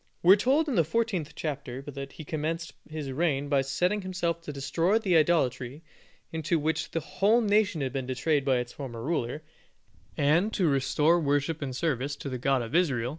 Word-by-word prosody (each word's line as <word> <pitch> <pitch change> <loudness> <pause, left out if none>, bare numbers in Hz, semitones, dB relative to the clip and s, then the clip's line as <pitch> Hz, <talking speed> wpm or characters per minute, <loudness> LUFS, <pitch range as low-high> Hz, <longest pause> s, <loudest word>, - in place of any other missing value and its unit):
We 180 +3 +9
are - - +7
told 270 +9 +2
in 285 - -1
the 170 - +4
fourteenth 190 -3 -1
chapter 140 -4 -5
that 140 -1 -7
he - - -9
commenced 160 +2 -3 0.2
his 155 -3 -5
reign 145 -1 0
by 140 -1 +3
setting 180 +10 0
himself 180 -3 -2
to 160 - -6
destroy 165 +8 +1
the 195 -6 +1
idolatry 150 -3 +1 0.5
into 160 +1 0
which 155 +1 -1
the 165 - -2
whole 200 +8 +2
nation 205 -6 +2
had 130 -1 -2
been 135 -2 -3
betrayed 140 +3 +1
by 135 -2 +2
its 125 0 -4
former 120 -5 -7
ruler, 150 -1 -2 0.7
and 165 +9 +3
to 185 -5 +2
restore 145 +4 +3
the 160 -4 -2
worship 145 +3 0
and 130 -3 -4
service 140 -2 -1
of 140 - -3
the 130 - -4
God 135 0 +1
of 115 - -8
Israel. 135 -9 +2
150 Hz, 195 wpm, -28 LUFS, 135-175 Hz, 0.7 s, We